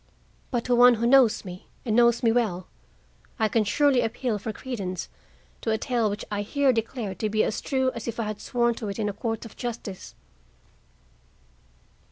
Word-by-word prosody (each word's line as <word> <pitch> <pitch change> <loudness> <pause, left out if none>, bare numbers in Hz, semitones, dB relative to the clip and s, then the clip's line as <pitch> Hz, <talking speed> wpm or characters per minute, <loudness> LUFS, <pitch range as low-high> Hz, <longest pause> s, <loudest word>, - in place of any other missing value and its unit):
But, 240 -3 -1
to 250 - +1
one 245 0 +7
who 230 +1 -1
knows 245 -4 +5
me, 180 0 -9 0.2
and 220 -3 0
knows 235 0 +4
me 230 - +4
well, 210 -7 0 0.7
I 220 -3 +2
can 220 +1 +2
surely 265 +4 +3
appeal 225 -1 -2
for 220 - -4
credence 200 -7 -5 0.5
to - - -2
a 220 - +2
tale 235 -2 0
which 205 - -5
I 205 0 -1
here 275 +5 +2
declare 225 -2 -3
to 215 +4 -2
be 215 +1 +2
as - - -2
true 260 -2 0
as 235 - -7
if 235 0 -4
I - - +1
had 215 -1 -5
sworn 240 -1 +1
to 215 - -3
it 200 - -5
in 210 -2 -1
a - - -4
court 225 +2 -3
of 225 - -11
justice." 225 -5 -6
225 Hz, 195 wpm, -26 LUFS, 210-245 Hz, 0.7 s, one